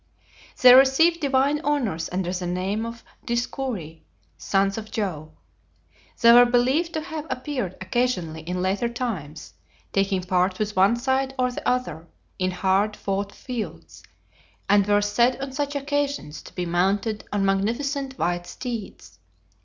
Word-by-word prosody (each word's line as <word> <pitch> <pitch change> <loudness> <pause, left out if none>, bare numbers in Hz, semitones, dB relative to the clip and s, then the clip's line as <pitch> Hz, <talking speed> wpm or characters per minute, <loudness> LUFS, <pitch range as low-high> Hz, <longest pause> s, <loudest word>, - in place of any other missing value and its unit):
They 250 -1 +9
received 275 +6 +5
divine 280 0 +1
honors 235 - -1
under 180 -1 -2
the 180 -1 -3
name 190 +5 -2
of 230 0 -9 0.2
Dioscuri 235 - -3 0.3
(sons 195 0 0
of 220 -1 -6
Jove). 180 -10 -3 0.9
They 235 -1 +7
were 245 0 +8
believed 260 +8 +2
to 315 - -1
have 315 -1 -6
appeared 250 -8 -3
occasionally 185 -6 -1
in 180 +3 -3
later 195 +5 0
times, 205 - -5 0.4
taking 195 -1 +1
part 185 0 +1
with 210 0 -2
one 195 +5 +4
side 265 +2 -1
or 250 -1 +1
the - - -2
other, 250 -10 -2 0.3
in 185 0 +1
hard 190 +3 +1
fought 200 0 -3
fields, 245 -2 -7 0.7
and 200 0 +4
were 205 0 +3
said 235 +5 +2
on 270 0 -5
such 285 +1 -3
occasions 285 - -2
to - - -14
be 180 - -2
mounted 195 +5 0
on 205 -1 0
magnificent 260 +8 -1
white 175 0 -1
steeds. 235 -5 -7
220 Hz, 145 wpm, -24 LUFS, 185-260 Hz, 0.9 s, They